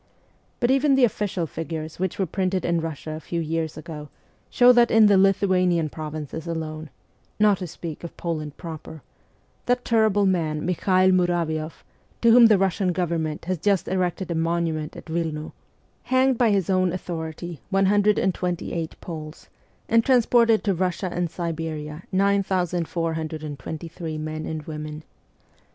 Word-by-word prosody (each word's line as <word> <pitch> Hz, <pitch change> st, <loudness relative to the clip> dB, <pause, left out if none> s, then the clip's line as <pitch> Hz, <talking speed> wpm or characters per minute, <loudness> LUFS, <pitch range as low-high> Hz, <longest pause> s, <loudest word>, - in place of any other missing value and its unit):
But 240 Hz, 0 st, +2 dB
even 275 Hz, +1 st, +4 dB
the 265 Hz, -, +3 dB
official 205 Hz, -6 st, 0 dB
figures 160 Hz, 0 st, -6 dB
which 190 Hz, -1 st, -2 dB
were 195 Hz, -, +1 dB
printed 185 Hz, +1 st, -1 dB
in 170 Hz, -1 st, +1 dB
Russia 160 Hz, -1 st, -5 dB
a 155 Hz, -, -5 dB
few 170 Hz, +2 st, -4 dB
years 160 Hz, -1 st, -2 dB
ago 150 Hz, -2 st, -8 dB, 0.4 s
show 245 Hz, 0 st, +6 dB
that 240 Hz, -1 st, +5 dB
in 225 Hz, -1 st, +6 dB
the 205 Hz, -1 st, +6 dB
Lithuanian 185 Hz, -4 st, +3 dB
provinces 155 Hz, +1 st, -6 dB
alone 160 Hz, -1 st, -4 dB, 0.5 s
not 210 Hz, -2 st, +4 dB
to 180 Hz, -, -4 dB
speak 165 Hz, -1 st, -8 dB
of 170 Hz, -, -8 dB
Poland 155 Hz, -4 st, -4 dB
proper 160 Hz, -2 st, -8 dB, 0.6 s
that 245 Hz, 0 st, +1 dB
terrible 220 Hz, -3 st, +3 dB
man 160 Hz, -5 st, 0 dB
Mikhael 185 Hz, +1 st, +3 dB
Muravioff, 170 Hz, -3 st, 0 dB, 0.4 s
to 235 Hz, -, +6 dB
whom 235 Hz, 0 st, +8 dB
the 215 Hz, -2 st, +5 dB
Eussian 190 Hz, 0 st, +1 dB
Government 165 Hz, -4 st, -2 dB
has 185 Hz, -1 st, -2 dB
just 200 Hz, +1 st, +1 dB
erected 180 Hz, -1 st, -1 dB
a -, -, -1 dB
monument 165 Hz, -2 st, -1 dB
at -, -, -10 dB
Wilno, 160 Hz, -2 st, -3 dB, 0.5 s
hanged 260 Hz, 0 st, +3 dB
by 235 Hz, -1 st, +3 dB
his 195 Hz, -4 st, +1 dB
own 185 Hz, -2 st, +2 dB
authority 170 Hz, -2 st, -5 dB
128 190 Hz, -4 st, +1 dB
Poles, 155 Hz, -2 st, -8 dB, 0.4 s
and 230 Hz, 0 st, +4 dB
transported 235 Hz, -3 st, +4 dB
to 200 Hz, -, +1 dB
Russia 185 Hz, +1 st, -1 dB
and 175 Hz, -1 st, -1 dB
Siberia 160 Hz, -2 st, -4 dB
9,423 165 Hz, -4 st, -2 dB
men 155 Hz, 0 st, -4 dB
and 155 Hz, -1 st, -4 dB
women. 150 Hz, 0 st, -7 dB
170 Hz, 140 wpm, -24 LUFS, 160-195 Hz, 0.6 s, whom